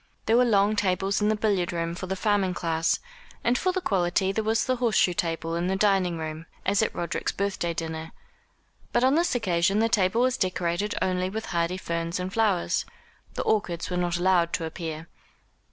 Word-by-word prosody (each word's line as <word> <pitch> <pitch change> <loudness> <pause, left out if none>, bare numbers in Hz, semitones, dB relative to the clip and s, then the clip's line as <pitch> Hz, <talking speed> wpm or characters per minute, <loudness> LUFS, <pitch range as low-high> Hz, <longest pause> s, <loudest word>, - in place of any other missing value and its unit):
There 225 - +3
were 250 +1 +5
long 210 -2 +3
tables 195 0 0
in 210 - +3
the 215 - +2
billiard 200 -5 0
room 170 -1 -2
for 185 +2 -6
the 190 - -2
farming 195 -2 +1
class; 165 -1 0 0.4
and 240 - +2
for 370 +9 +1
the 375 0 -2
quality 190 - +1
there 220 +2 -1
was 220 +1 +1
the 255 -1 0
horse 235 -4 +1
shoe 180 - +4
table 165 -1 -2
in 170 +1 -1
the 190 - 0
dining 190 -4 +2
room, 160 0 -6 0.2
as 200 +2 +3
at 220 - -1
Roderick's 170 -2 -2
birthday 195 -3 -2
dinner. 160 0 -5 0.8
But 240 - +3
on 260 +1 +4
this 335 -2 +2
occasion 185 -3 +1
the 225 +1 +3
table 205 +2 +2
was 255 +1 +2
decorated 185 +2 -1
only 185 0 0
with 220 +3 -4
hardy 170 +2 0
ferns 170 -1 -3
and 185 +2 -4
flowers. 215 -6 +1 0.5
The - - -2
orchids 180 -5 -1
were 180 - -1
not 175 -1 0
allowed 175 -1 +2
to 165 - -1
appear. 160 0 -6
185 Hz, 200 wpm, -26 LUFS, 170-215 Hz, 0.8 s, were